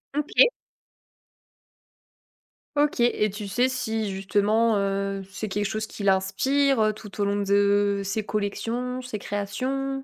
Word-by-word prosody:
OK. 300 Hz, -, +4 dB, 2.3 s
OK, 290 Hz, -3 st, +1 dB
et 215 Hz, -3 st, +2 dB
tu 205 Hz, 0 st, -6 dB
sais 245 Hz, +6 st, +2 dB
si 225 Hz, -5 st, -2 dB
justement, 210 Hz, +3 st, +2 dB
heu, 195 Hz, 0 st, -1 dB
c'est 215 Hz, +2 st, -5 dB
quelque 205 Hz, +2 st, -1 dB
chose 215 Hz, +2 st, -2 dB
qui 205 Hz, -, -8 dB
l'inspire, 220 Hz, +8 st, +2 dB
heu, 215 Hz, 0 st, +3 dB
tout 210 Hz, -1 st, -12 dB
au 205 Hz, -, +2 dB
long 200 Hz, 0 st, 0 dB
de 200 Hz, 0 st, +2 dB
ses 205 Hz, +2 st, -2 dB
collections, 230 Hz, +5 st, -2 dB
ses 250 Hz, -4 st, -5 dB
créations? 270 Hz, +7 st, -3 dB
210 Hz, 130 wpm, -25 LUFS, 200-250 Hz, 2.3 s, OK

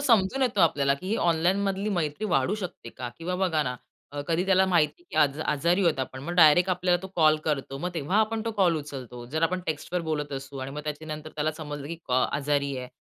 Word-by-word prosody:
समजून 240 Hz, -2 st, +3 dB
येतो 235 Hz, -6 st, +1 dB
आपल्याला, 145 Hz, -5 st, +3 dB
की 175 Hz, +7 st, -10 dB
ही 220 Hz, -, +1 dB
ऑनलाईनमधली 190 Hz, +4 st, +1 dB
मैत्री 170 Hz, +1 st, -1 dB
वाढू 135 Hz, +9 st, +2 dB
शकते 180 Hz, -, -6 dB
का 125 Hz, +1 st, -6 dB
किंवा 175 Hz, +2 st, -3 dB
बघा 175 Hz, -5 st, +1 dB
ना, 125 Hz, -2 st, -3 dB, 0.4 s
अ, 145 Hz, -, -4 dB
कधी 165 Hz, +2 st, +1 dB
त्याला 190 Hz, 0 st, +4 dB
माहितीय 175 Hz, -, +1 dB
की -, -, -7 dB
आज 145 Hz, 0 st, 0 dB
आजारी 170 Hz, +6 st, +1 dB
आहोत 165 Hz, -5 st, +2 dB
आपण. 130 Hz, 0 st, -5 dB
मग 170 Hz, +5 st, -4 dB
डायरेक्ट 175 Hz, +2 st, +6 dB
आपल्याला 180 Hz, -1 st, +1 dB
तो -, -, -5 dB
कॉल 155 Hz, -2 st, +5 dB
करतो. 135 Hz, -2 st, -2 dB
मग 175 Hz, -, -2 dB
तेव्हा 165 Hz, +4 st, -1 dB
आपण 220 Hz, 0 st, 0 dB
तो 230 Hz, -, -1 dB
कॉल 175 Hz, -4 st, +4 dB
उचलतो. 130 Hz, -5 st, -7 dB
जर 160 Hz, +1 st, -1 dB
आपण 180 Hz, +3 st, +1 dB
टेक्स्टवर 160 Hz, +3 st, -2 dB
बोलत 150 Hz, -2 st, -2 dB
असू 135 Hz, 0 st, -6 dB
आणि 130 Hz, +1 st, -5 dB
मग 145 Hz, +2 st, -5 dB
त्याच्यानंतर 155 Hz, 0 st, -5 dB
त्याला 155 Hz, +1 st, 0 dB
समजलं 145 Hz, -2 st, -7 dB
की 165 Hz, +3 st, -5 dB
कॉ 130 Hz, 0 st, +2 dB
आजारी 140 Hz, -1 st, 0 dB
आहे, 125 Hz, 0 st, -6 dB
160 Hz, 220 wpm, -27 LUFS, 145-185 Hz, 0.4 s, डायरेक्ट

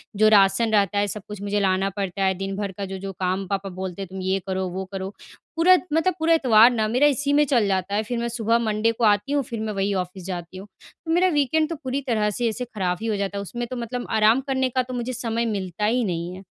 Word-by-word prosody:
जो 215 Hz, +2 st, +4 dB
राशन 205 Hz, +2 st, +4 dB
रहता 205 Hz, -1 st, +2 dB
है 205 Hz, -, +1 dB
सब 210 Hz, +1 st, -5 dB
कुछ 210 Hz, -1 st, -8 dB
मुझे 205 Hz, 0 st, -1 dB
लाना 190 Hz, 0 st, +1 dB
पड़ता 195 Hz, -1 st, -2 dB
है। 190 Hz, 0 st, +3 dB
दिन 195 Hz, +1 st, -4 dB
भर 200 Hz, -1 st, -3 dB
का 200 Hz, -, -3 dB
जो-जो 195 Hz, 0 st, -6 dB
काम 185 Hz, +1 st, -1 dB
पापा 195 Hz, 0 st, -3 dB
बोलते 185 Hz, 0 st, -6 dB
हैं 195 Hz, -, -5 dB
तुम 190 Hz, 0 st, -7 dB
ये 190 Hz, +1 st, 0 dB
करो, 190 Hz, 0 st, -1 dB
वो 190 Hz, +2 st, -5 dB
करो। 190 Hz, -1 st, -4 dB, 0.5 s
पूरा 360 Hz, +3 st, +6 dB, 0.2 s
मतलब 325 Hz, +4 st, +2 dB
पूरा 325 Hz, +1 st, +3 dB
इतवार 240 Hz, -7 st, +6 dB
ना 220 Hz, -3 st, 0 dB
मेरा 250 Hz, +7 st, +3 dB
इसी 285 Hz, 0 st, +1 dB
में 295 Hz, +1 st, +4 dB
चल 245 Hz, -7 st, +2 dB
जाता 190 Hz, 0 st, -1 dB
है। 215 Hz, -, +1 dB
फिर 240 Hz, +2 st, -4 dB
मैं 235 Hz, -, -1 dB
सुबह 230 Hz, 0 st, +1 dB
मंडे 220 Hz, 0 st, +1 dB
को 230 Hz, +1 st, -5 dB
आती 210 Hz, +5 st, +3 dB
हूँ, 285 Hz, -1 st, +1 dB
फिर 230 Hz, -2 st, -6 dB
मैं 215 Hz, -1 st, -3 dB
वही 200 Hz, 0 st, 0 dB
ऑफ़िस 185 Hz, -1 st, -4 dB
जाती 180 Hz, -1 st, -6 dB
हूँ। 195 Hz, +2 st, -9 dB, 0.4 s
तो 325 Hz, -, -2 dB
मेरा 355 Hz, +3 st, +4 dB
वीकेंड 310 Hz, +3 st, +2 dB
तो 335 Hz, -, -3 dB
पूरी 265 Hz, +2 st, -2 dB
तरह 215 Hz, -3 st, +1 dB
से 235 Hz, +3 st, -1 dB
ऐसे 250 Hz, +3 st, -4 dB
ख़राब 190 Hz, -6 st, -2 dB
ही 225 Hz, -, -3 dB
हो 220 Hz, -, 0 dB
जाता 200 Hz, 0 st, -3 dB
है -, -, -2 dB
उसमें 240 Hz, +5 st, -5 dB
तो 255 Hz, -, -6 dB
मतलब 240 Hz, +1 st, -4 dB
आराम 220 Hz, +3 st, +4 dB
करने 260 Hz, -1 st, +1 dB
का 255 Hz, +1 st, +1 dB
तो 255 Hz, +1 st, -8 dB
मुझे 245 Hz, +1 st, -3 dB
समय 235 Hz, -1 st, -2 dB
मिलता 200 Hz, -2 st, -2 dB
ही 240 Hz, +3 st, +2 dB
नहीं 175 Hz, -3 st, -3 dB
है। 190 Hz, -, -11 dB
210 Hz, 265 wpm, -23 LUFS, 195-245 Hz, 0.5 s, पूरा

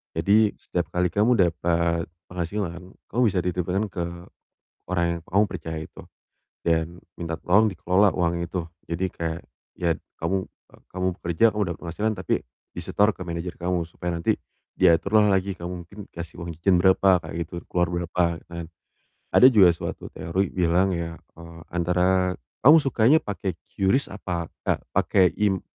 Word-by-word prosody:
Jadi 100 Hz, +6 st, +4 dB
setiap 90 Hz, 0 st, -2 dB
kali 90 Hz, 0 st, +2 dB
kamu 105 Hz, +4 st, +3 dB
dapet 85 Hz, -2 st, +1 dB, 0.2 s
penghasilan, 90 Hz, 0 st, -3 dB, 0.3 s
kamu 120 Hz, +4 st, +1 dB
bisa 95 Hz, -2 st, 0 dB
dititipkan 90 Hz, +3 st, -1 dB
ke 85 Hz, -1 st, -3 dB, 0.9 s
orang 85 Hz, -1 st, +1 dB
yang -, -, -13 dB
kamu 100 Hz, +3 st, +3 dB
percaya 80 Hz, -3 st, -5 dB
itu, -, -, -13 dB, 0.6 s
dan 85 Hz, +1 st, 0 dB, 0.2 s
minta 80 Hz, -1 st, -3 dB
tolong 100 Hz, +6 st, +4 dB
dikelola 95 Hz, +3 st, +3 dB
uangnya 85 Hz, -1 st, 0 dB
itu. 90 Hz, -, -2 dB, 0.3 s
Jadi 85 Hz, +3 st, -1 dB
kayak, 80 Hz, 0 st, -4 dB, 0.4 s
ya 85 Hz, -2 st, +1 dB, 0.2 s
kamu, 95 Hz, +3 st, 0 dB
e -, -, -35 dB, 0.2 s
kamu 95 Hz, 0 st, -2 dB
bekerja, 85 Hz, +6 st, +1 dB
kamu 105 Hz, -, +1 dB
dapet -, -, -15 dB
penghasilan, 105 Hz, +6 st, -2 dB
tapi 95 Hz, -2 st, -2 dB, 0.4 s
disetor 105 Hz, +1 st, +2 dB
ke -, -, -11 dB
manajer 85 Hz, +1 st, -4 dB
kamu 90 Hz, -1 st, -1 dB
supaya 85 Hz, 0 st, -4 dB
nanti -, -, +2 dB, 0.4 s
diatur 100 Hz, +5 st, +4 dB
lah 105 Hz, -, +4 dB
lagi, 95 Hz, +1 st, 0 dB
kamu 85 Hz, 0 st, -6 dB
mungkin 100 Hz, -, -17 dB
dikasih 85 Hz, 0 st, -8 dB
uang 85 Hz, -, -6 dB
jajan 95 Hz, +2 st, +3 dB
berapa, 95 Hz, +1 st, +5 dB
kayak 80 Hz, -, -7 dB
gitu, -, -, -18 dB, 0.2 s
keluar 90 Hz, -1 st, +1 dB
berapa, 85 Hz, 0 st, -1 dB, 0.3 s
dan 85 Hz, -1 st, -6 dB, 0.7 s
ada 125 Hz, -, +8 dB
juga 100 Hz, -5 st, +7 dB
suatu -, -, -6 dB
teori 95 Hz, +3 st, -1 dB
bilang 90 Hz, +2 st, +2 dB
ya, 85 Hz, -1 st, -4 dB, 0.2 s
eee, 85 Hz, 0 st, -11 dB
antara 90 Hz, +1 st, +2 dB, 0.3 s
kamu 150 Hz, +5 st, +9 dB
sukanya 135 Hz, +1 st, +4 dB
pake 95 Hz, -, -4 dB, 0.2 s
QRIS 100 Hz, +8 st, +2 dB
apa 90 Hz, -4 st, -4 dB, 0.2 s
ka -, -, +1 dB, 0.2 s
pake, 95 Hz, -3 st, +4 dB
im 100 Hz, -3 st, +1 dB
90 Hz, 160 wpm, -25 LUFS, 85-95 Hz, 0.9 s, kamu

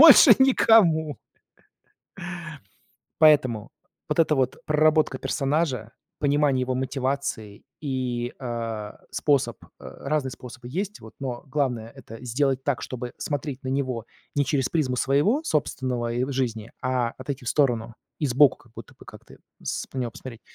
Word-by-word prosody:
больше 315 Hz, -2 st, +10 dB
никому". 180 Hz, -, +5 dB, 2.0 s
Поэтому 130 Hz, -8 st, +4 dB, 0.4 s
вот -, -, 0 dB
эта 160 Hz, -2 st, +4 dB
вот 130 Hz, -2 st, 0 dB
проработка 155 Hz, -1 st, +3 dB
персонажа, 135 Hz, -6 st, -1 dB, 0.3 s
понимание 145 Hz, -2 st, +2 dB
его 130 Hz, 0 st, -1 dB
мотивации 130 Hz, -5 st, -3 dB, 0.2 s
и, 125 Hz, -4 st, -2 dB
а, 115 Hz, -4 st, -5 dB
способ 135 Hz, -7 st, +1 dB
э, -, -, -16 dB
разные 140 Hz, -1 st, -3 dB
способы 125 Hz, 0 st, -10 dB
есть, 195 Hz, +6 st, -3 dB
вот, 110 Hz, -, -12 dB
но 125 Hz, -3 st, -4 dB
главное- 125 Hz, -5 st, -1 dB
это 115 Hz, +3 st, -11 dB
сделать 130 Hz, +2 st, 0 dB
так, 145 Hz, -4 st, 0 dB
чтобы 125 Hz, -1 st, -5 dB
смотреть 145 Hz, -2 st, -4 dB
на 130 Hz, -, -5 dB
него 130 Hz, -4 st, -2 dB, 0.3 s
не 145 Hz, -, +2 dB
через 135 Hz, -1 st, 0 dB
призму 135 Hz, -6 st, 0 dB
своего 145 Hz, -, +2 dB
собственного 130 Hz, -, -1 dB
ой 125 Hz, +4 st, -1 dB
жизни, 115 Hz, -4 st, -2 dB
а 125 Hz, -2 st, 0 dB
отойти 130 Hz, 0 st, -5 dB
в -, -, -3 dB
сторону, 120 Hz, -4 st, +1 dB, 0.2 s
и 150 Hz, -, 0 dB
сбоку 135 Hz, +2 st, +5 dB
как 120 Hz, -, -23 dB
будто -, -, -11 dB
бы -, -, -14 dB
как-то -, -, -14 dB, 0.3 s
с -, -, -3 dB
на 135 Hz, -, -4 dB
него 125 Hz, -2 st, -1 dB
посмотреть. 120 Hz, -3 st, -9 dB
130 Hz, 145 wpm, -25 LUFS, 120-145 Hz, 2.0 s, больше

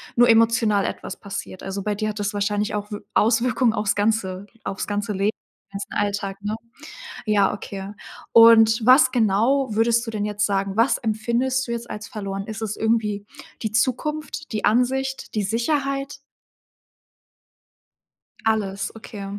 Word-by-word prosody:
nur 240 Hz, 0 st, +6 dB
emotional 225 Hz, -3 st, +4 dB
etwas -, -, -5 dB
passiert. 195 Hz, -2 st, -7 dB
Also, 195 Hz, 0 st, -5 dB
bei 210 Hz, -, -1 dB
dir 215 Hz, +1 st, -2 dB
hat 210 Hz, 0 st, -5 dB
das 205 Hz, +1 st, -2 dB
wahrscheinlich 205 Hz, 0 st, -1 dB
auch 210 Hz, 0 st, -4 dB
W 205 Hz, -, -4 dB
Auswirkungen 235 Hz, +2 st, +2 dB
auf's 210 Hz, -2 st, 0 dB
ganze 205 Hz, -2 st, -1 dB, 0.2 s
auf's 195 Hz, -, -4 dB
ganze 205 Hz, 0 st, -2 dB
Leben, 195 Hz, +2 st, +1 dB
den 200 Hz, -2 st, -13 dB
ganzen 200 Hz, 0 st, -6 dB
Alltag, 200 Hz, -1 st, -2 dB
ne? 210 Hz, +1 st, -2 dB, 0.7 s
Ja, 205 Hz, -3 st, +3 dB
okay 200 Hz, -1 st, -7 dB, 0.4 s
und 225 Hz, 0 st, +7 dB
was 255 Hz, 0 st, +7 dB
genau, 240 Hz, +4 st, +2 dB
würdest 230 Hz, +2 st, +2 dB
du 225 Hz, -, -5 dB
denn 210 Hz, -2 st, -2 dB
jetzt 210 Hz, 0 st, 0 dB
sagen 195 Hz, -1 st, -1 dB
was 235 Hz, +4 st, +3 dB
empfindest 235 Hz, +4 st, 0 dB
du -, -, -4 dB
jetzt 235 Hz, 0 st, -4 dB
als 210 Hz, 0 st, -6 dB
verloren? 195 Hz, -2 st, -5 dB
Ist 220 Hz, 0 st, -7 dB
es 215 Hz, -2 st, -3 dB
irgendwie 215 Hz, -2 st, 0 dB, 0.4 s
die 220 Hz, -, -2 dB
Zukunft, 300 Hz, +7 st, -1 dB
die 215 Hz, -2 st, -1 dB
Ansicht, 265 Hz, +4 st, 0 dB
die 215 Hz, -, 0 dB
Sicherheit? 275 Hz, +6 st, -1 dB, 2.3 s
Alles, 200 Hz, -3 st, 0 dB
okay. 210 Hz, -2 st, -8 dB
215 Hz, 150 wpm, -23 LUFS, 205-235 Hz, 2.3 s, und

